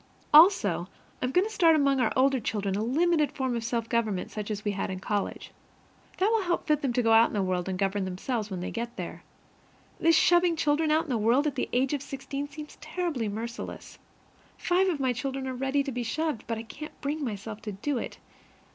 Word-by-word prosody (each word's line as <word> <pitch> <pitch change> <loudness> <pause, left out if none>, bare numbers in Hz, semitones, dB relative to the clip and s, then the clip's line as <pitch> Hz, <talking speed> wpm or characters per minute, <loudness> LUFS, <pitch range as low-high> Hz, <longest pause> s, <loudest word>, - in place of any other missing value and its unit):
Also 295 - +6 0.3
I - - +1
am 250 - -1
going 360 +7 +3
to 440 - -5
start 330 -5 +5
among 280 -3 +3
our 235 -4 +2
older 265 0 +3
children 205 -3 -2
a 205 - -1
limited 305 +6 +2
form 260 -3 -1
of 230 - -3
self 230 0 -2
government 220 -6 -1
such 210 -1 -5
as 210 0 -4
we 205 - +1
had 200 0 -3
in 185 -1 -4
college. 205 +1 -3 0.7
That 395 +4 +2
will 450 -1 +3
help 350 -2 -1
fit 300 -1 +2
them 270 - 0
to 245 0 +1
go 225 - +3
out 225 +1 +7
into 210 - -3
the - - +1
world 185 0 -1
and 185 - -2
govern 195 0 0
themselves 210 +4 -3
when 185 -3 -4
they 180 - -4
get 235 +1 -4
there. - - -6 0.8
This 330 0 +4
shoving 350 -1 +4
children 305 0 +1
into 315 +2 +2
the 240 -4 0
world 235 +7 +3
at 300 - 0
the - - -2
age 260 +3 +1
of 285 - -1
sixteen 275 +1 -5
seems 300 +1 -10
terribly 305 - -2
merciless. 230 +3 -6 0.6
Five 375 +1 +2
of 325 -5 -1
my 260 -2 +1
children 265 +2 -3
are 260 - -3
ready 270 +2 0
to 275 - -4
be 245 0 -3
shoved, 295 +2 -2
but 230 0 -2
I 225 - -5
can't 295 +7 -10
bring 295 +2 -3
myself 215 -2 -5
to 215 - -5
do 245 +7 -2
it. - - -6
255 Hz, 225 wpm, -28 LUFS, 220-300 Hz, 0.8 s, out